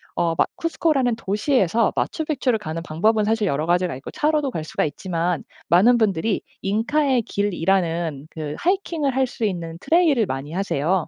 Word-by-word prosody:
어 170 -1 +1
마 - - +5
쿠스코라는 300 -7 +1
도시에서 220 - +1
마추픽추를 275 -7 0
가는 165 -4 -5
방법은 210 +7 +1
사실 215 0 +1
여러 150 -1 0
가지가 175 -3 +1
있고 135 - -9
차로도 300 -2 +1
갈 160 -8 -4
수가 - - -1
있지만 170 +1 -2 0.2
많은 205 +9 +6
분들이 205 -2 +1 0.4
'잉카의 275 -1 +2
길'이라는 170 -7 -1
그 150 -2 -5
하이킹을 335 -7 0
할 265 0 +3
수 230 - -3
있는 170 -4 -3
트레일을 315 - +3
많이 135 -2 -5
하세요. 175 -2 0
200 Hz, 375 characters per minute, -22 LUFS, 165-255 Hz, 0.4 s, 많은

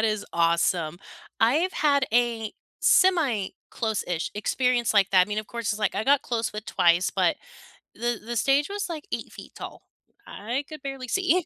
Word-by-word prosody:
that 225 - +2
is 215 -2 0
awesome. 170 0 +1 0.4
I've 305 +12 +3
had 280 -3 +2
a 230 -3 +1 0.3
semi-close-ish 220 - +1
experience 240 +2 +1
like 195 -1 +4
that- 185 -2 +6
I - - -16
mean, 210 +1 -2
of 215 - -4
course, 235 -3 -3
it's, 210 - -5
like, 210 - 0
I 220 - -1
got 280 0 +4
close 230 -3 -2
with 210 0 -7
Twice, 175 0 +3
but - - +2 0.6
the 240 -2 -2
the 240 +1 -4
stage 275 - +2
was, 405 -1 -3
like, 320 -1 -6
8 - - -4
feet - - -11
tall, - - -9 0.4
I 240 +7 -4
could 310 -2 -9
barely 270 -2 -6
see. 365 +1 +1
230 Hz, 180 wpm, -25 LUFS, 205-275 Hz, 0.6 s, that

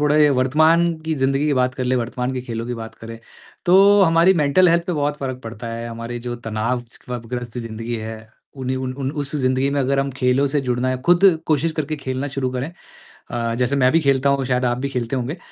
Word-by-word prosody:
थोड़े 150 0 +4
वर्तमान 160 +6 +3
की 160 0 -1
ज़िंदगी 135 +1 +1
की 150 - +2
बात 125 0 +1
कर 130 - -3
लें, 125 +1 +1
वर्तमान 125 +2 -2
के 130 - -2
खेलों 115 -2 -5
की 120 - -3
बात 115 -1 -8
करें, 115 0 -10 0.5
तो 195 +3 +6
हमारी 165 +1 +5
मेंटल 165 +6 +4
हेल्थ 170 0 +2
पे 180 - -1
बहुत 145 -2 -1
फ़र्क 130 -2 -4
पड़ता 115 +1 -7
है, 115 0 -5
हमारी 115 +1 -6
जो 120 - -3
तनावग्रस्त 120 +1 -4
ज़िंदगी 115 0 -5
है, 110 0 -6 0.4
उन 130 -1 -4
युन 130 0 -2
उन 135 -1 -2
उस 140 +1 -6
ज़िंदगी 130 0 +1
में 140 - -1
अगर 135 +1 +1
हम 135 0 -2
खेलों 130 +1 +1
से 145 +1 0
जुड़ना 125 -1 -1
है 130 - 0
खुद 175 +2 +4 0.2
कोशिश 160 +1 +1
करके 155 0 -3
खेलना 130 -1 -3
शुरू 135 -2 -2
करें, 130 +5 -4 0.6
अ, 115 -1 -1
जैसे 125 +3 +1
मैं 130 -2 +3
भी 165 - +4
खेलता 140 -1 +2
हूँ, 140 -1 +1
शायद 125 0 0
आप 120 0 +1
भी 140 +2 -3
खेलते 125 -1 -2
होंगे। 130 +6 -3
130 Hz, 220 wpm, -21 LUFS, 120-145 Hz, 0.6 s, तो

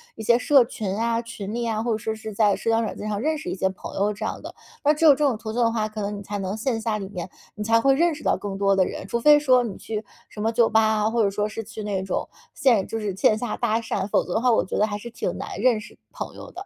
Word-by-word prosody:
一 220 - -7
些 235 +2 +4
社 265 -1 +5
群 215 -7 -4
啊， 230 +1 0
群 210 -3 -7
里 235 0 -2
啊， 220 -1 -1
或 235 - -1
者 220 - +1
说 220 0 -3
是 220 -1 -7
在 205 -1 +3
社 - - -3
交 225 0 +3
软 220 - -4
件 210 - -5
上 210 -1 -2
认 310 +6 0
识 305 - -6
一 - - -2
些 190 0 +1
朋 190 - -9
友 205 +2 +1
这 210 +1 -5
样 - - -4
的， - - -8 0.3
那 290 - +5
只 320 +2 +1
有 300 - +10
这 270 - +3
种 280 -7 +2
途 220 0 -6
径 245 - 0
的 230 -1 +3
话， 215 -2 -1
可 215 0 -6
能 205 0 -3
你 200 - -8
才 205 +1 -4
能 195 +2 -3
线 225 0 -1
下 220 -1 -1
里 195 -2 -5
面 180 -2 -6 0.3
你 210 - -4
才 225 +1 +4
会 270 +3 +4
认 335 +1 +2
识 300 - -11
到 - - +2
更 200 -1 -5
多 195 0 +3
的 190 - +4
人， - - -6
除 235 - -1
非 295 +4 +7
说 255 -4 +4
你 215 -5 -5
去 220 -1 -5 0.3
什 210 - -8
么 220 +1 +1
酒 230 0 +4
吧 220 0 +4
啊， 215 0 +2
或 235 -1 +1
者 200 - +3
说 205 +1 -1
是 220 +1 -6
去 215 0 -8
那 200 -2 -2
种 190 - -2 0.3
线 240 -8 +3
就 225 - -3
是 205 -3 -3
线 215 +2 +3
下 235 -1 -3
搭 225 -2 0
讪， 210 -3 -2
否 - - +2
则 180 - -5
的 220 - +1
话 250 0 +4
我 225 - +2
觉 - - -4
得 215 - +3
还 205 - -3
是 235 +3 -9
挺 - - -3
难 - - -6
认 245 -3 +3
识 215 - -13
朋 - - -6
友 - - -10
的。 380 +3 -8
220 Hz, 340 characters per minute, -24 LUFS, 205-235 Hz, 0.3 s, 有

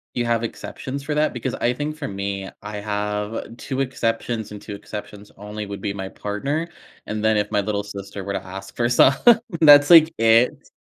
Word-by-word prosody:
You 120 - 0
have 115 -1 +1
exceptions 135 +4 -6
for 150 - -3
that? 155 +1 +1
Because 120 - -3
I 120 +1 0
think 150 +3 -4
for 150 -3 -5
me, 100 -1 -4
I 105 0 -6
have 105 +2 -3
2 135 +1 -3
exceptions, 115 -3 -2
and 105 - -8
2 105 - -8
exceptions 105 0 -9
only 105 +1 -6
would 100 0 -7
be 100 - -2
my 95 -1 -5
partner, 140 +11 -3 0.4
and 105 0 -4
then 110 -1 +3
if 105 0 -1
my 105 - +2
little 100 0 -2
sister 100 -1 -8
were 100 - -4
to 95 -1 -3
ask 95 +1 -9
for 120 0 +1
some, 130 +2 +6 0.5
that's, 145 -2 +8
like, 165 -1 +8
it. 115 +2 +3
110 Hz, 200 wpm, -22 LUFS, 100-125 Hz, 0.5 s, that's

